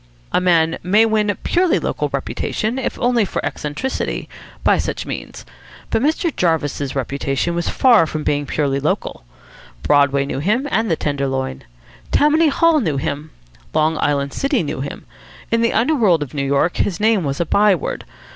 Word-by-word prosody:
A - - +2
man 165 -2 +2
may 210 +5 +4
win 215 -1 +1
a 205 - 0
purely 360 0 +1
local - - -2
reputation, 225 +5 -2
if 265 - -3
only 240 -2 +2
for 195 - -3
eccentricity, 150 - -3 0.4
by - - +3
such - - -3
means. - - -7 0.5
But - - +1
Mr. 315 +3 0
Jarvis's 145 -5 -1
reputation 135 +4 -1
was 170 0 -1
far 235 -10 +4
from 155 0 -4
being 145 -1 0
purely 140 -2 0
local. 140 - -2 0.6
Broadway 140 -1 +3
knew 135 - -4
him, 215 - 0
and 225 -1 +1
the 165 - +2
Tenderloin. 135 - -3 0.5
Tammany 310 +2 +4
Hall 320 +2 +3
knew 160 - -1
him. 145 +3 -3 0.5
Long 155 +1 +2
Island 140 -1 0
City 275 - 0
knew 145 -3 -4
him. 140 - -7 0.5
In 230 0 +2
the 230 - +2
underworld 225 - +3
of 135 - -11
New 140 -2 -2
York 140 +5 +1
his 180 -4 -1
name 215 -3 +2
was 140 -1 -2
a 170 - +1
by 200 +3 +4
word. 165 - -4
170 Hz, 170 wpm, -19 LUFS, 145-225 Hz, 0.6 s, may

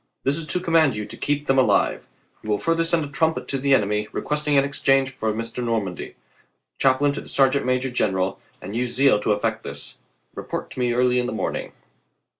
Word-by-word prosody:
This 135 +2 +2
Is 165 -2 -4
to 180 - +3
command 165 -7 +3
you 105 0 -4
to - - -7
keep 145 0 -1
them 135 -1 +3
alive. 130 - +2 0.3
You 110 - -8
will 105 - +2
further 165 +4 +1
send 165 -1 +1
3. 145 - -7
trumpet 160 +3 0
to 135 - -1
the 140 +1 +4
enemy, 105 -1 0
requesting 150 0 -1
an 135 - +5
exchange 135 -1 +1
for 110 -4 -2
Mr. 115 +3 -4
Normandy, 110 -7 -3 0.6
chaplain 135 +2 +3
to - - -5
the - - -11
sergeant 135 0 +2
major 130 0 0
general, 95 -5 0 0.2
and 100 +4 -6
use 125 0 -2
zeal 135 -4 +4
to 105 - 0
effect 105 - -1
this. - - -7 0.3
Report - - -6
to - - -8
me 125 -1 +1
early 125 0 +2
in 125 - -1
the - - -4
morn - - -2
ing. - - -6
130 Hz, 215 wpm, -23 LUFS, 115-145 Hz, 0.6 s, an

